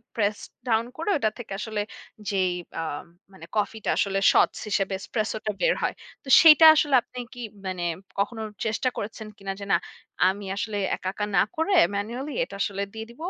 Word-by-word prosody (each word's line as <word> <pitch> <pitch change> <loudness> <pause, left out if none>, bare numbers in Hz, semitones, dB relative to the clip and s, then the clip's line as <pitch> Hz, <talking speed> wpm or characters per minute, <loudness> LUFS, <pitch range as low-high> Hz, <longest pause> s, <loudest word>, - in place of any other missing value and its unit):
Press 210 -2 +1 0.3
down 225 0 +2
করে, 330 +5 -3
ওটা 220 -6 +1
থেকে 225 -5 -7
আসলে 215 -1 -3 0.5
যেই 190 -2 +1 0.3
আ - - -1 0.5
মানে 165 -3 -12
কফি 210 +2 0
টা - - 0
আসলে 195 -1 +1
সটস - - +3
হিসেবে 195 -1 0
এসপ্রেসো 220 +2 -2
টা 215 - +1
বের - - +4
হয়। - - 0 0.3
তো - - -18
সেইটা 320 0 +9
আসলে 295 -3 +3
আপনি 250 +2 -10
কি 245 - -11 0.3
মানে 180 -2 -3 0.4
কখনো 220 +3 -1 0.2
চেষ্টা 220 +4 0
করেছেন 215 +1 -5
কিনা? 195 -1 -5
যে 200 - -6
"না, - - +6 0.5
আমি 200 +2 -1
আসলে 205 +1 -3 0.2
একা, 185 - -4
একা 210 - -2
না - - +6
করে 325 +5 0 0.2
ম্যানুয়ালি। 240 +8 -4
এটা 195 - -8
আসলে 200 0 -1
দিয়ে 220 0 -6
দেব 235 - -16
215 Hz, 185 wpm, -25 LUFS, 200-240 Hz, 0.5 s, সেইটা